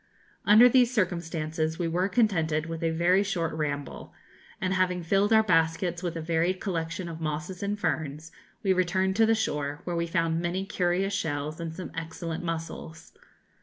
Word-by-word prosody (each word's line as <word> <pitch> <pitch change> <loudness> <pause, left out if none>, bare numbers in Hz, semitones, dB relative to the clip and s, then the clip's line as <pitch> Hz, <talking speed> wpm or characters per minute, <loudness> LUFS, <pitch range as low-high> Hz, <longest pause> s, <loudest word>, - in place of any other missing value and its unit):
Under 215 +4 +9
these 250 -1 +4
circumstances 165 -6 -1
we 175 - -1
were 180 +4 0
contented 165 -9 +1
with 165 -1 -5
a 165 - +1
very 170 +4 +3
short 185 -5 -1
ramble, 145 -2 -4 0.4
and 185 0 0
having 180 -1 +1
filled 195 +5 +2
our 220 0 +6
baskets 170 -2 +1
with 175 -2 -3
a 165 - -3
varied 170 +3 0
collection 170 -2 -3
of 165 -1 -7
mosses 160 +4 -4
and 205 +1 -2
ferns, 155 -2 -2 0.3
we 190 -2 +3
returned 185 +1 +1
to 225 -1 +5
the 225 - +4
shore, 150 -7 -2
where 175 - -3
we 170 0 -1
found 165 0 0
many 180 +3 -2
curious 190 +1 0
shells 150 -3 -2
and 165 -1 -5
some 185 0 -7
excellent 165 +1 -5
mussels. 165 -1 -6
170 Hz, 170 wpm, -27 LUFS, 160-190 Hz, 0.4 s, Under